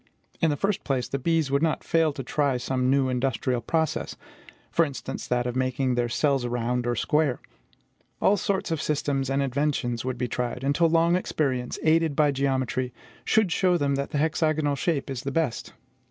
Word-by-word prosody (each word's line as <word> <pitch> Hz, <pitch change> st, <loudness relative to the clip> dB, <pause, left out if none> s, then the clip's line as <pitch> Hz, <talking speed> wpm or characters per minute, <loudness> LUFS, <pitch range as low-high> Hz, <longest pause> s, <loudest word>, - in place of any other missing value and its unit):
In 165 Hz, -, +4 dB
the 145 Hz, -, 0 dB
first 200 Hz, +6 st, -1 dB
place, 130 Hz, -4 st, -1 dB
the 140 Hz, -, -3 dB
bees 160 Hz, -1 st, +1 dB
would 140 Hz, +1 st, +2 dB
not 160 Hz, -1 st, 0 dB
fail 165 Hz, -2 st, +2 dB
to 135 Hz, -, -6 dB
try 140 Hz, 0 st, 0 dB
some 125 Hz, +1 st, -1 dB
new 135 Hz, 0 st, +3 dB
industrial 125 Hz, -1 st, 0 dB
process; 160 Hz, +2 st, -1 dB, 0.6 s
for 165 Hz, -, +4 dB
instance, 140 Hz, -4 st, -5 dB
that 125 Hz, 0 st, 0 dB
of 125 Hz, 0 st, -3 dB
making 130 Hz, 0 st, 0 dB
their 120 Hz, -1 st, 0 dB
cells 140 Hz, +1 st, +1 dB
round 120 Hz, 0 st, -1 dB
or 120 Hz, -, +1 dB
square. 150 Hz, +1 st, +1 dB, 0.8 s
All 200 Hz, -, +4 dB
sorts 195 Hz, -3 st, -1 dB
of 160 Hz, -, -1 dB
systems 140 Hz, -3 st, -1 dB
and 135 Hz, +1 st, +1 dB
inventions 135 Hz, -3 st, -1 dB
would 130 Hz, -1 st, -3 dB
be 125 Hz, -, -1 dB
tried, 125 Hz, +1 st, -3 dB
until 145 Hz, +5 st, +3 dB
long 165 Hz, +1 st, +3 dB
experience, 130 Hz, -8 st, -1 dB
aided 160 Hz, -1 st, +3 dB
by 150 Hz, -1 st, +3 dB
geometry, 130 Hz, -2 st, -1 dB, 0.3 s
should 220 Hz, -5 st, +3 dB
show 180 Hz, 0 st, +3 dB
them 140 Hz, -3 st, 0 dB
that 140 Hz, 0 st, -2 dB
the -, -, -2 dB
hexagonal 155 Hz, -1 st, +1 dB
shape 145 Hz, 0 st, -1 dB
is 135 Hz, -2 st, -4 dB
the 140 Hz, -, -3 dB
best. 150 Hz, -6 st, -1 dB
140 Hz, 185 wpm, -26 LUFS, 125-155 Hz, 0.8 s, In